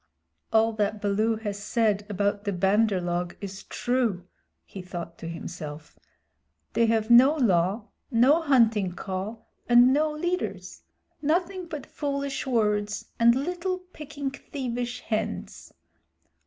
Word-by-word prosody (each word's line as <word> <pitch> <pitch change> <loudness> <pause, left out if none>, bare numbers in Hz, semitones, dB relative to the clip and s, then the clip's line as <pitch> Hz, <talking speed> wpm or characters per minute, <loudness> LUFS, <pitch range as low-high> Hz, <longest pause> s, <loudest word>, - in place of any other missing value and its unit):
"All 225 0 +3
that 210 0 0
Baloo 210 +2 +1
has 205 -2 -5
said 205 -2 0
about 205 0 0
the 205 - -1
Bandar 195 +2 +2
log 175 0 -2
is 195 -1 -7
true," 240 -8 -1 0.4
he 195 - -9
thought 175 -2 -7
to 165 - -6
himself. 155 -3 -8 0.7
"They 230 - +3
have 225 0 +1
no 260 +6 +8
Law, 200 - +1 0.2
no 270 +6 +4
Hunting 225 - +3
Call, 190 +5 -5 0.2
and 240 +2 +7
no 305 +2 +2
leaders 350 +4 -3 0.4
nothing 350 +4 0
but 305 -4 -6
foolish 280 -1 -3
words 210 -4 0
and 235 +1 +6
little 355 +6 -2
picking 300 -6 -7
thievish 245 -3 -4
hands. 215 -2 -4
225 Hz, 125 wpm, -26 LUFS, 200-275 Hz, 0.7 s, no